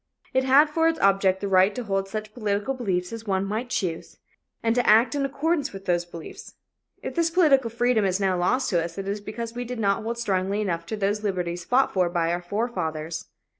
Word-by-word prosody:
It 260 - +3
had 275 +4 +6
for 325 +2 +1
its 330 0 0
object 195 -1 +3
the 200 - -2
right 190 +1 +4
to 250 - -3
hold 195 -2 -2
such 215 0 -5
political 210 +2 -1
beliefs 190 -7 -2
as 225 -1 -8
one 190 0 0
might 220 +5 -3
choose, 180 -9 -3 0.5
and 225 0 +2
to 245 0 +2
act 225 +6 +5
in 285 -1 0
accordance 290 +1 -1
with 195 0 -9
those 175 -1 +1
beliefs. 170 -2 -10 0.5
If - - -4
this 335 -1 +1
political 295 -8 +4
freedom 235 -1 +1
is 190 0 +1
now 190 -2 +1
lost 225 +10 +1
to 170 -3 +2
us, 170 +1 -7
it 195 0 -4
is 205 +1 -3
because 230 +2 -6
we 245 0 -4
did 245 0 -6
not 200 -2 +1
hold 230 +2 -3
strongly 195 -3 -1
enough 170 -5 -2
to 220 - -4
those 205 +1 0
liberties 175 -3 -2
fought 260 +2 +2
for 180 -2 +2
by 170 -1 0
our 175 +1 -1
forefathers. 175 -6 -3
205 Hz, 220 wpm, -25 LUFS, 185-245 Hz, 0.5 s, had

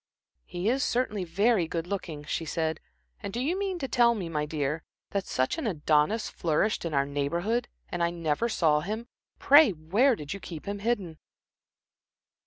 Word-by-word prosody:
"He 175 +3 -3
is 260 +3 +2
certainly 225 -5 0
very 200 +1 +2
good 165 0 -3
looking," 175 -6 -5
she 155 +2 -2
said. 160 -1 -2 0.4
"And - - -5
do 235 - -3
you 295 +8 0
mean 390 -1 -2
to 275 -5 -3
tell 240 -2 +4
me, 185 -6 -4
my 150 -2 -1
dear, 150 0 -2 0.3
that 200 -1 -2
such 130 - 0
an 290 - -2
Adonis 155 +4 +2
flourished 175 +5 0
in 165 - -3
our 140 0 +3
Neighborhood, 170 +12 -1 0.2
and 175 - -4
I 170 - +3
never 170 +6 -1
saw 155 -8 +3
him. 215 +8 -4 0.3
Pray, 290 0 +7
where 200 - +2
did 150 -4 -6
you 200 - -6
keep 165 -5 -8
him 200 0 -4
hidden?" 200 -7 -2
180 Hz, 180 wpm, -28 LUFS, 155-230 Hz, 0.4 s, Pray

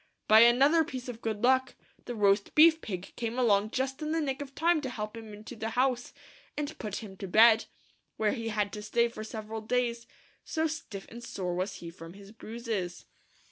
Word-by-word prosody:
By 215 +1 +8
another 270 +8 +6
piece 260 -5 -7
of 235 -1 -7
good 220 -1 -3
luck, 260 +1 +3 0.3
the 245 - -5
Roast 200 -1 +2
Beef 320 +1 +7
Pig 185 -2 -6
came 235 0 -3
along 210 -4 +3
just 265 +4 -2
in 305 +1 -2
the 325 - +1
nick 275 -3 -2
of 275 -1 -8
time 335 -1 +2
to 265 - -4
help 215 -2 -5
him 225 -1 -9
into 210 +3 -10
the 220 0 -4
house, 255 -1 +1 0.5
and 295 +1 -3
put 210 0 -4
him 195 -3 -9
to 195 - -6
bed, 220 +3 +6 0.5
where 215 -1 +2
he 230 -3 -4
had 210 -2 -1
to 210 - -5
stay 235 +3 +2
for 215 -2 -8
several 220 0 -6
days, 235 0 -1 0.4
so 320 0 -1
stiff 295 -11 -5
and 235 +1 -10
sore 180 -6 -4
was 185 +3 -2
he 170 -1 -8
from 165 0 -11
his 200 +1 -13
bruises. 220 -5 -5
230 Hz, 205 wpm, -29 LUFS, 210-260 Hz, 0.5 s, By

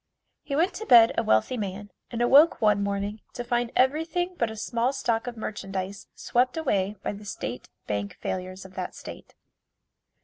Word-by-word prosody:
He 280 - -4
went 340 +6 +2
to 440 - -6
bed 230 -2 +8
a - - +2
wealthy 110 - +2
man 205 -1 -5 0.2
and 240 0 -1
awoke 285 +7 +6
one 210 -3 +3
morning 200 +1 -2
to 245 - -4
find 240 -1 -1
everything 325 +7 +1
but 235 -8 0
a 220 - -7
small 235 +4 -1
stock 230 -3 -1
of 240 -1 -5
merchandise 195 -2 -5
swept 250 +4 +1
away 205 -10 0
by - - -1
the 205 +1 -10
State 125 - -6 0.2
Bank 100 -1 -3
failures 185 +1 -5
of 190 - -13
that 185 -1 -5
state. - - -10
220 Hz, 175 wpm, -26 LUFS, 195-250 Hz, 0.2 s, bed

